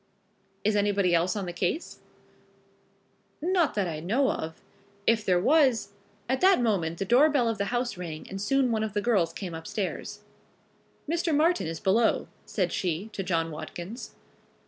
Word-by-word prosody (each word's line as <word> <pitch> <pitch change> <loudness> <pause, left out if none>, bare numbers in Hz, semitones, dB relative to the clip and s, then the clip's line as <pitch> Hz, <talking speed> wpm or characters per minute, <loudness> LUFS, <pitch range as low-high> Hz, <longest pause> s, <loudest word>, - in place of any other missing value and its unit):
"Is 210 +1 +2
anybody 200 -3 +2
else 170 +3 +2
on 200 -2 -2
the 175 - -5
case?" 185 - -2 1.4
"Not 345 - +1
that 200 -3 +1
I 155 -2 -4
know 230 - +1
of. 160 0 -5 0.5
If 225 -1 +3
there 180 -3 +3
was 260 - +3 0.2
" 205 0 -35
At 260 +2 0
that 380 -3 +6
moment 185 -9 0
the 195 - -2
door 255 +9 +5
bell 275 -6 +2
of 225 -3 -1
the 200 - +1
house 240 -1 -2
rang 165 -3 -6
and 195 +1 -6
soon 260 +4 +2
one 220 -1 0
of 215 -2 -2
the 205 - 0
girls 195 -8 +2
came 180 -2 -6
upstairs. 170 +4 -4 0.9
"Mr. 330 0 0
Martin 330 - +2
is 165 0 -4
below," 220 +4 +2 0.2
said - - -1
she 185 +4 -2
to 195 - -3
John 165 -3 -1
Watkins. 175 +8 -7
205 Hz, 170 wpm, -27 LUFS, 175-250 Hz, 1.4 s, that